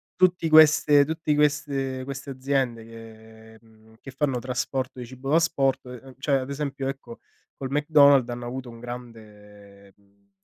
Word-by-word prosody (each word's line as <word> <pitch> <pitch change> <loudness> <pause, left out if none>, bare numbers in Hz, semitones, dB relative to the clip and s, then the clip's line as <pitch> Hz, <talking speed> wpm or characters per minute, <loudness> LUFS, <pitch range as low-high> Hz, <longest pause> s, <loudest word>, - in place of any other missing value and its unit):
tutti 180 -3 +2
queste 150 -2 +6
tutti 155 -1 -2
queste 140 -3 -1
queste 140 +1 -7
aziende 130 -3 -2
che, 110 -1 -14
mhmm, 110 -1 -23 0.2
fanno 135 -4 -1
trasporto 130 +1 -4
di 125 - -6
cibo 130 +2 -9
da 155 - +3
asporto, 135 -6 0
ehm 130 +1 -12
cioè 135 0 +1
ad 130 +1 -6
esempio 140 -1 -4
ecco 135 -3 -7 0.4
col 135 - -6
McDonald's 145 -2 +4
hanno 120 0 -6
avuto 130 0 -6
un 115 - -13
grande, 105 -4 -12
ehm, 100 0 -33
130 Hz, 150 wpm, -25 LUFS, 115-140 Hz, 0.4 s, queste